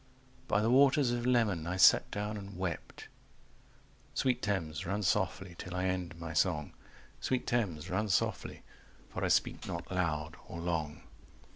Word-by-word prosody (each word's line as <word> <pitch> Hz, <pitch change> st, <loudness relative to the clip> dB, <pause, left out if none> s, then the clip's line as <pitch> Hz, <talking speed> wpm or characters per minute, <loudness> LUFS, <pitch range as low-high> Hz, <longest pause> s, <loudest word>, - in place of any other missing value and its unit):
By 100 Hz, -, +2 dB
the 115 Hz, -, +2 dB
waters 135 Hz, 0 st, +5 dB
of 120 Hz, 0 st, -1 dB
Leman 105 Hz, -10 st, +2 dB
I 90 Hz, +1 st, -2 dB
sat 95 Hz, -, +6 dB
down 105 Hz, +1 st, -3 dB
and 100 Hz, -2 st, -8 dB
wept… 90 Hz, -3 st, -5 dB, 1.1 s
Sweet 130 Hz, -2 st, +1 dB
Thames, 85 Hz, -7 st, -2 dB
run 100 Hz, +4 st, -2 dB
softly 95 Hz, -1 st, 0 dB
till 90 Hz, 0 st, -6 dB
I 90 Hz, +1 st, 0 dB
end 90 Hz, -2 st, -2 dB
my 85 Hz, -1 st, -5 dB
song, 80 Hz, -3 st, +1 dB, 0.5 s
Sweet 130 Hz, -1 st, -1 dB
Thames, 95 Hz, -10 st, -1 dB
run 105 Hz, +3 st, -1 dB
softly, -, -, -1 dB, 0.5 s
for -, -, -4 dB
I -, -, +2 dB
speak -, -, +1 dB
not 85 Hz, +1 st, -5 dB
loud 80 Hz, -3 st, -1 dB
or 85 Hz, -, -7 dB
long. 80 Hz, -3 st, -2 dB
95 Hz, 155 wpm, -32 LUFS, 85-105 Hz, 1.1 s, sat